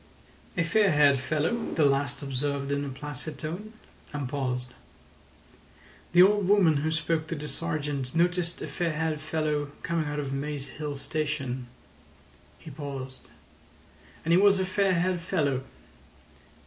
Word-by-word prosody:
"A 170 - +3
fair 200 +5 +3
haired 145 -2 +5
fellow," 155 - 0 0.2
the 155 - +4
last 140 0 +1
observed 140 +1 -2
in 140 0 0
a 140 - -3
placid 145 +2 -6
tone, 180 +9 -5 0.4
and 145 -3 -3
paused. 125 -2 -2 1.4
"The 175 +1 +9
old 205 0 +4
woman 185 -7 +5
who 150 +3 0
spoke 160 0 0
to 165 - -3
the 150 0 -5
sergeant 150 -5 -3
noticed 175 0 +1
a - - -3
fair 170 -3 -1
haired 155 -1 -1
fellow 155 -2 -1
coming 165 -2 0
out 145 0 -3
of 140 -2 -3
Maze 140 0 -3
Hill 145 +1 -5
Station." 140 -4 -2 0.9
He 160 - -11
paused. 135 -2 -7 1.0
"And 165 - +1
he 175 - +7
was 200 0 +6
a 190 - +1
fair 190 0 +2
haired 180 +1 +1
fellow. 150 -7 0
150 Hz, 150 wpm, -28 LUFS, 140-170 Hz, 1.4 s, The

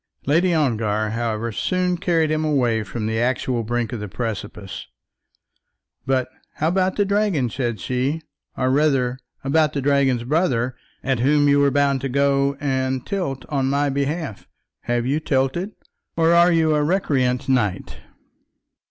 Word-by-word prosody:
Lady 170 +6 +3
Ongar, 110 -8 0
however, 115 0 -2
soon 180 - 0
carried 165 -3 +1
him 155 0 0
away 125 -7 +1
from 110 +2 -5
the 110 +1 -1
actual 125 0 0
brink 120 0 -2
of 120 - -4
the 105 - -5
precipice. 105 -2 -5 1.2
"But 130 -1 +1 0.3
how 155 - 0
about 185 +1 +1
the 205 - +2
dragon," 200 - +1
said 120 -3 -2
she, 130 +8 -2 0.3
"or 130 0 +1
rather 135 -3 +2 0.2
about 150 +2 +2
the 140 - -1
dragon's 135 -3 +2
brother, 130 -4 0 0.3
at 130 -3 0
whom 145 +3 +3
you 145 0 +4
were 140 0 +4
bound 140 -1 +1
to 135 - -2
go 140 +1 +1
and 130 -2 -1
tilt 155 -11 -3
on 135 -3 0
my 140 +1 +1
behalf? 140 - -3 0.4
Have 120 0 0
you 140 +4 +1
tilted, 150 +8 -1 0.4
or 165 0 +4
are 170 +1 +6
you 160 -2 +3
a 150 - +2
recreant 140 -7 0
knight?" 120 -8 0
135 Hz, 150 wpm, -22 LUFS, 120-155 Hz, 1.2 s, are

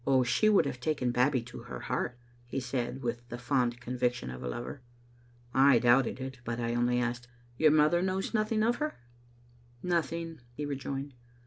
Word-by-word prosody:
She 170 - +3
would 205 -7 +5
have 130 -3 -3
taken 130 -2 0
Babbie 125 +1 +2
to 120 - -9
her - - -8
heart," 120 - -2 0.3
he 120 - -2
said, 125 0 -3
with 120 0 -2
the 120 - -5
fond 120 -1 0
conviction 125 - -1
of 60 - -8
a - - -4
lover. 120 - -5 0.7
I 135 -1 +6
doubted 120 +2 +3
it, 130 0 -6
but 120 0 -3
I 120 0 -1
only 120 +1 +2
asked, 120 0 -2 0.2
" 120 0 -29
Your 155 - +6
mother 155 +3 +4
knows 190 +3 -1
nothing 215 0 +1
of 235 +2 +2
her?" 305 0 -2 0.5
" 120 0 -29
Nothing," 165 0 -1 0.2
he 150 - -3
rejoined. 140 0 -4
125 Hz, 185 wpm, -30 LUFS, 120-150 Hz, 0.7 s, I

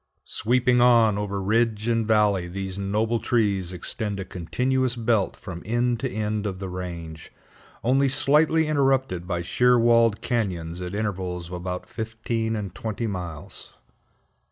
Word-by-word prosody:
Sweeping 125 +1 +2
on 115 -4 +5
over 100 -1 -2
ridge 110 +2 +1
and 115 -2 +1
valley, 105 -5 +3
these 95 +1 -5
noble 105 +4 0
trees 100 -8 0
extend 100 +3 -4
a 95 - -4
continuous 125 +9 -1
belt 115 -4 +1
from 90 -4 -8
end 120 +2 0
to 130 - -2
end 105 -1 -2
of 95 -2 -4
the 95 0 -5
range, 85 -3 -7 0.5
only 135 +3 +3
slightly 155 +4 +3
interrupted 135 - +1
by 90 -2 -2
sheer 125 +7 +3
walled 115 -2 +4
cañons 90 -7 -2
at 90 +2 -5
intervals 90 -5 -3
of - - -8
about 90 +1 -4
fifteen 110 0 -3
and 100 -4 -4
twenty 110 +2 -4
miles. 90 -7 -5
105 Hz, 145 wpm, -25 LUFS, 95-120 Hz, 0.5 s, on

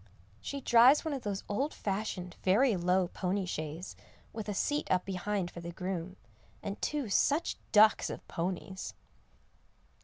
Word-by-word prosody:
She 280 0 -5
drives 250 +6 +6
one 315 - -1
of 270 - -3
those 200 -3 -3
old 270 +9 -1
fashioned, 190 -3 -3
very 215 +5 +4
low 180 0 +2
pony 190 +1 -1
shays, 160 +1 -5 0.4
with 220 -1 -5
a - - -1
seat 290 +9 0
up 185 -1 +2
behind 190 -1 -2
for - - -8
the 170 0 -6
groom, 185 0 -4 0.5
and 200 - -5
two 295 -5 -1
such 290 - +2 0.2
ducks 215 0 +6
of - - -7
ponies. 185 +2 -4
195 Hz, 150 wpm, -31 LUFS, 180-230 Hz, 0.5 s, drives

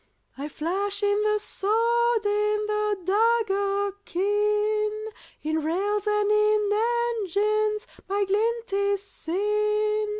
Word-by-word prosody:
I 280 +2 -5
flash 390 +7 -2
in 410 0 +2
the 425 0 +2
sword, 460 +2 +1
In 420 +1 +1
the 425 -1 0
dagger 405 -1 +1
keen; 420 +3 +1 0.5
In 315 +1 -1
rails 400 +6 -1
and 420 0 +2
in 425 -1 +3 0.5
engines 425 +2 0 0.2
My 400 +1 +1
glint 450 +2 -1
is 400 0 +1
seen. 425 +3 -1
420 Hz, 105 wpm, -25 LUFS, 400-425 Hz, 0.5 s, in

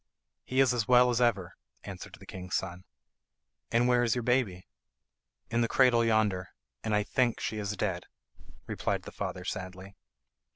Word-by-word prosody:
"He 130 +1 +2
is 130 -2 +4
as 115 -4 -1
well 125 0 +6
as 120 0 0
ever," 100 -7 +1 0.3
answered - - -8
the - - -15
king's 90 -1 -5
son. 90 -1 -3 0.9
"And 120 +1 +3
where 125 -1 +4
is 120 -1 +2
your 120 - -2
baby?" 115 -8 0 0.9
"In 120 +1 +2
the 115 - +2
cradle 125 -2 +4
yonder, 105 -5 +1 0.3
and 110 -1 0
I 105 - +2
think 120 +2 +1
she 110 - -3
is 105 0 -3
dead," 95 -3 -2 0.6
replied - - -2
the - - -9
father - - -5
sadly. 95 +1 -6
110 Hz, 165 wpm, -30 LUFS, 95-125 Hz, 0.9 s, well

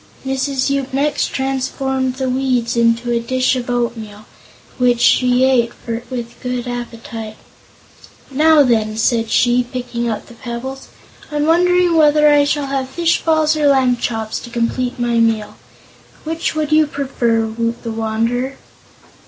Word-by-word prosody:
Mrs. 270 0 -1
Yoop 275 -1 -2
next 290 +1 +1
transformed 265 -1 -2
the 265 0 -2
weeds 255 -2 0
into 235 +1 +2
a 235 - +1
dish 255 +2 0
of 250 -1 -4
oatmeal, 225 -3 -3 0.5
which 245 -1 +3
she 250 +1 +4
ate 240 -3 +2
with 235 0 -6
good 250 -1 -3
appetite. 230 -2 -7 0.9
"Now, 305 +2 +5
then," 220 -4 +1
said 225 0 +1
she, 245 +1 +3
picking 245 -1 -4
up 215 - -4
the - - -14
pebbles. 245 +3 -7 0.4
"I'm 295 0 0
wondering 355 +1 +3
whether 300 -1 +5
I 290 -1 +4
shall 290 0 0
have 270 -1 -3
fish 335 +4 +1
balls 315 -1 +2
or 300 -1 +2
lamb 260 -3 +3
chops 225 -2 -3
to 240 - -10
complete 245 +2 -2
my 240 -1 +1
meal. 225 -2 0 0.7
Which 320 0 -3
would 310 -1 -2
you 310 0 +4
prefer, 245 -5 -1
Woot 230 +1 -3
the 230 - -4
Wanderer?" 230 +4 -2
250 Hz, 145 wpm, -18 LUFS, 235-275 Hz, 0.9 s, Now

